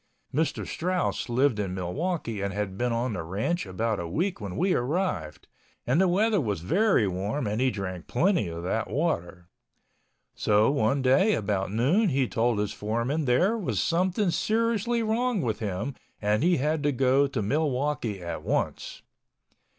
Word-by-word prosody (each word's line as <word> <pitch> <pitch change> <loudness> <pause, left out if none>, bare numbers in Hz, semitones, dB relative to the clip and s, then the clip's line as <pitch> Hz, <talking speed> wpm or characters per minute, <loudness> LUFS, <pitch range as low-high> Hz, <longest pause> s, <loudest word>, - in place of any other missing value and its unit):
Mr. 155 +4 0
Strauss 180 -7 -2
lived 125 -1 +2
in 95 -3 -2
Milwaukee 115 - -2
and 100 0 -1
had 100 -2 -2
been 120 +4 -1
on 115 +1 -1
the 90 - -3
ranch 100 - -2
about 110 +3 -1
a 85 - -4
week 175 - -2
when 100 -3 -5
we 185 +2 +2
arrived, 120 - -2 0.4
and 135 +9 +3
the 190 - +4
weather 205 +2 +2
was 105 - -2
very 185 - +3
warm 100 +9 -2
and 105 +3 -1
he 130 - +3
drank 95 -6 -5
plenty 170 - +2
of 85 0 -6
that 110 +5 -1
water. 90 - -2 0.9
So 105 +4 +3
one 135 0 +1
day 165 +12 +4
about 100 -2 -1
noon 150 - +2
he 135 -3 +1
told 115 0 +1
his 105 -1 -1
foreman 115 +8 -1
there 175 - +3
was 210 -7 -2
something 185 +3 +1
seriously 230 +4 +1
wrong 230 +1 0
with 115 -3 -1
him 105 +5 -3 0.3
and 105 +1 +1
he 175 +2 +3
had 150 +3 0
to 145 0 +2
go 135 +2 +3
to 135 -3 -3
Milwaukee 130 - -1
at 85 - -4
once. - - -2
130 Hz, 165 wpm, -27 LUFS, 105-175 Hz, 0.9 s, the